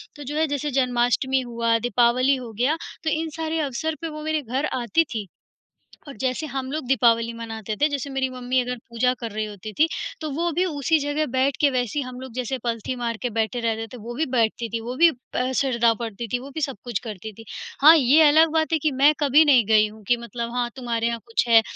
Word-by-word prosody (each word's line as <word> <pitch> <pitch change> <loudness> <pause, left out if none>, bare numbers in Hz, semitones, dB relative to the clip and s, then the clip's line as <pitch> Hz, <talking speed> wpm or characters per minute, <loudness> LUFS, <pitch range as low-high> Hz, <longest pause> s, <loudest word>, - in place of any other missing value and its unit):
तो 290 - -9
जो 295 +3 -5
है 320 - +3
जैसे 285 0 -2
जन्माष्टमी 255 +1 +1
हुआ, 235 -2 0
दीपावली 245 +4 +3
हो 245 -3 -7
गया। 290 +6 +2 0.3
तो 315 - 0
इन 320 +1 -1
सारे 320 0 -2
अवसर 305 +2 -2
पे 330 - -3
वो 305 0 -7
मेरे 315 0 0
घर 265 +3 -2 0.2
आती 240 +8 +2
थीं। 215 -3 -3 0.8
और 275 - -9
जैसे 260 +4 -1
हम 265 -2 -4
लोग 305 -3 -3
दीपावली 230 -2 +3
मनाते 225 -2 -5
थे, 300 - +5
जैसे 280 -1 -3
मेरी 270 -1 -1
मम्मी 255 0 -1
अगर 250 0 -4
पूजा 245 +2 +1
कर 230 -3 -5
रही 215 +1 -2
होती 210 0 -8
थी। 315 +7 +3 0.3
तो 310 - -3
वो 340 +4 -1
भी 365 - +2
उसी 315 -1 +1
जगह 290 +2 -1
बैठ 265 +1 +2
के 285 - +5
वैसे 250 +2 -1
हम 255 -1 -7
लोग 260 -3 -9
जैसे 255 +1 -2
पलथी 235 +1 -2
मारकर 240 0 -3
बैठे 225 +2 0
रहते 225 -1 -2
थे, - - -7
वो 235 +3 -7
भी 315 - 0
बैठती 230 0 +1
थीं 230 +1 -3
वो 245 +2 -5
भी 340 0 +7 0.2
अ, 255 +1 0
सरदाओ 235 -4 +2
पढ़ती 230 0 -5
थी, 245 - +1
वो 270 +3 -9
भी 315 - -3
सब 270 -5 -2
कुछ 240 -5 -2
करती 215 +1 -7
थी। 225 +2 -13 0.4
हाँ, 315 +3 +9
ये 285 +3 +5
अलग 315 +2 +5
बात 320 0 +1
है 320 - +3
कि 305 +1 +1
मैं 295 +2 +7
कभी 295 +2 +5
नहीं 255 -6 +5
गई 215 -1 +5
हूँ 215 0 -14
कि 240 - +3
मतलब 235 0 -5
हाँ, 240 -1 0
तुम्हारे 235 -3 -1
यहाँ 235 0 -2
कुछ 230 +1 0
है 225 -1 +7
250 Hz, 235 wpm, -23 LUFS, 230-290 Hz, 0.8 s, हाँ